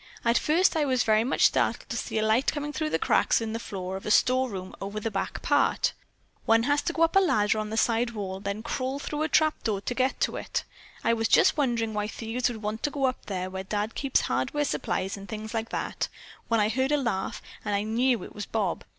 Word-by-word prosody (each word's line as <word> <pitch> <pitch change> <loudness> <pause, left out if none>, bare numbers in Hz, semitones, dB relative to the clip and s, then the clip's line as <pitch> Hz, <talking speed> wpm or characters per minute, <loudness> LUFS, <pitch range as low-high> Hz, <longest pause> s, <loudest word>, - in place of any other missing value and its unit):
At 235 0 +3
first 330 +9 +3
I 315 - +2
was 255 -3 +2
very 220 0 +3
much 260 - +3
startled - - +1
to - - -3
see - - -3
a 215 - +2
light 225 +5 +3
coming 295 0 -4
through 310 0 0
cracks - - +3
in 225 -1 -3
the 230 - -2
floor 190 -4 -5
of 190 - -7
a - - 0
storeroom 230 -6 +2
over 200 +2 -4
the 225 +1 -3
back 195 - -3
part. - - +2 0.5
One 225 0 +5
has 290 +3 +2
to 340 - -2
go 330 - +2
up 330 - +2
a - - +8
ladder 215 - +2
on 215 0 -3
the 220 - -3
side 235 +1 +2
wall 200 -4 -5
and 195 - -13
then 200 +2 -3
crawl 260 +2 -2
through 295 +1 -4
a 315 - 0
trapdoor 270 -10 +1
to 245 - -3
get 260 +2 0
to - - +1
it. - - -3 0.4
I - - +3
was 225 -1 +1
just - - +5
wondering 235 -6 0
why 210 0 -1
thieves 230 +3 -2
would 220 -3 -7
want 215 +1 -3
to - - 0
go 280 -1 -4
up 255 -1 -2
there 185 -2 -2
where 190 0 -4
Dad 210 +3 -2
keeps 275 -2 +1
hardware 295 -1 0
supplies 195 -7 -2
and 200 0 -10
things 220 0 -6
like 225 0 -2
that, - - -2 0.4
when 230 -1 +2
I 210 0 +3
heard 260 +5 0
a 295 - +4
laugh, 235 -9 -2 0.2
and 210 -1 -1
I 200 - 0
knew 235 +3 +1
it - - -10
was 210 - -6
Bob. 205 -5 -1
225 Hz, 245 wpm, -27 LUFS, 210-265 Hz, 0.5 s, a